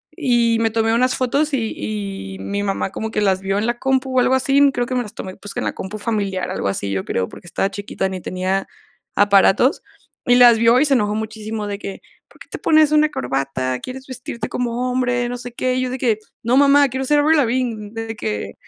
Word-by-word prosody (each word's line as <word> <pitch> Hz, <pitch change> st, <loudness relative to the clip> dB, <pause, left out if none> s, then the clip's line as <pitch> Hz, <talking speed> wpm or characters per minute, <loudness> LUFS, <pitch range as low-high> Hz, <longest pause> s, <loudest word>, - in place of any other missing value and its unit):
Y 240 Hz, -7 st, +2 dB
me 225 Hz, 0 st, +2 dB
tomé 225 Hz, 0 st, +1 dB
unas 255 Hz, +2 st, +2 dB
fotos 285 Hz, +4 st, 0 dB
y 230 Hz, -5 st, -1 dB
y 195 Hz, -, -5 dB
mi 200 Hz, -, -3 dB
mamá 195 Hz, -1 st, -2 dB
como 220 Hz, +2 st, -4 dB
que 210 Hz, -, -1 dB
las 190 Hz, -2 st, +2 dB
vio 195 Hz, +1 st, -1 dB
en 210 Hz, -, 0 dB
la 240 Hz, 0 st, -1 dB
compu 265 Hz, 0 st, 0 dB
o -, -, +7 dB
algo 260 Hz, +1 st, +3 dB
así, 275 Hz, +1 st, +4 dB
creo 245 Hz, -2 st, -1 dB
que 255 Hz, -, -4 dB
me 250 Hz, -, +1 dB
las 215 Hz, -4 st, -8 dB
tomé, 185 Hz, -1 st, -7 dB
pues 205 Hz, -, -9 dB
que -, -, -3 dB
en -, -, -3 dB
la -, -, -1 dB
compu 200 Hz, +3 st, -6 dB
familiar, 200 Hz, -4 st, -2 dB
algo -, -, -2 dB
así, 100 Hz, 0 st, -2 dB
yo 95 Hz, -1 st, -1 dB
creo, 95 Hz, 0 st, -1 dB
porque 175 Hz, -, -13 dB
estaba 195 Hz, +4 st, -1 dB
chiquita 200 Hz, -1 st, -3 dB
ni 185 Hz, -2 st, -6 dB
tenía 185 Hz, +1 st, -2 dB, 0.5 s
aparatos, 205 Hz, +5 st, +4 dB, 0.4 s
y 245 Hz, -, +5 dB
las 240 Hz, -2 st, +7 dB
vio 230 Hz, +2 st, +5 dB
y 300 Hz, -, +4 dB
se 285 Hz, -, +2 dB
enojó 210 Hz, -5 st, +1 dB
muchísimo 220 Hz, 0 st, -4 dB
de 200 Hz, -1 st, -4 dB
que: 195 Hz, -, -7 dB, 0.3 s
"¿Por -, -, -22 dB
qué -, -, -13 dB
te -, -, -7 dB
pones 310 Hz, -1 st, +4 dB
una 305 Hz, 0 st, +4 dB
corbata? 135 Hz, -, -2 dB
¿Quieres 260 Hz, +1 st, -8 dB
vestirte 250 Hz, -2 st, -6 dB
como 245 Hz, +1 st, -2 dB
hombre? 245 Hz, -1 st, 0 dB
No 245 Hz, -, -4 dB
sé 245 Hz, 0 st, -8 dB
qué". 255 Hz, +1 st, -1 dB
Y 255 Hz, -, 0 dB
yo 255 Hz, -, -1 dB
de 255 Hz, -, -4 dB
que: 225 Hz, -4 st, +1 dB, 0.2 s
"No 240 Hz, +3 st, +2 dB
mamá, 285 Hz, 0 st, +6 dB
quiero 260 Hz, +1 st, -3 dB
ser 295 Hz, +2 st, +3 dB
Avril 310 Hz, +2 st, +4 dB
Lavigne". 235 Hz, -5 st, 0 dB
De 225 Hz, 0 st, -5 dB
que: 105 Hz, -, -4 dB
230 Hz, 240 wpm, -20 LUFS, 200-255 Hz, 0.5 s, o